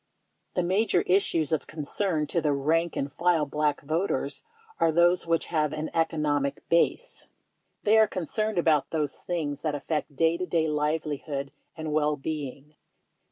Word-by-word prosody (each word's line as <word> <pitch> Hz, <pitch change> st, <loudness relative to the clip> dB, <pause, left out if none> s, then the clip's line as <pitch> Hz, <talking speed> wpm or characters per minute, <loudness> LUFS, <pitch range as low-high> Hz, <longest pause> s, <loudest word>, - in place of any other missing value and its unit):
The 180 Hz, -, +1 dB
major 185 Hz, 0 st, +2 dB
issues 170 Hz, -5 st, +2 dB
of 155 Hz, -, 0 dB
concern 155 Hz, +2 st, -1 dB
to 170 Hz, +3 st, -1 dB
the 150 Hz, -2 st, +2 dB
rank 160 Hz, +4 st, +1 dB
and 140 Hz, 0 st, -3 dB
file 170 Hz, -1 st, +2 dB
Black 150 Hz, 0 st, 0 dB
voter 160 Hz, +7 st, 0 dB, 0.5 s
are 165 Hz, -, +4 dB
those 175 Hz, +2 st, +3 dB
which 165 Hz, 0 st, +1 dB
have 155 Hz, -2 st, +1 dB
an 155 Hz, +1 st, -4 dB
economic 150 Hz, -4 st, 0 dB
base. 170 Hz, -, +1 dB, 0.6 s
They 215 Hz, +1 st, +5 dB
are 220 Hz, -, +6 dB
con 185 Hz, -3 st, -4 dB
cerned 215 Hz, +4 st, -1 dB
about 160 Hz, -4 st, +3 dB
those 150 Hz, -3 st, -1 dB
things 150 Hz, -5 st, -3 dB
that 155 Hz, -2 st, -1 dB
affect 150 Hz, 0 st, -3 dB
day 165 Hz, +3 st, +2 dB
to 180 Hz, +1 st, -3 dB
day 165 Hz, -2 st, +1 dB
livelihood 150 Hz, -2 st, -2 dB, 0.3 s
and 160 Hz, -1 st, -4 dB
well 150 Hz, 0 st, +2 dB
being. 145 Hz, -1 st, -6 dB
155 Hz, 160 wpm, -27 LUFS, 150-170 Hz, 0.6 s, are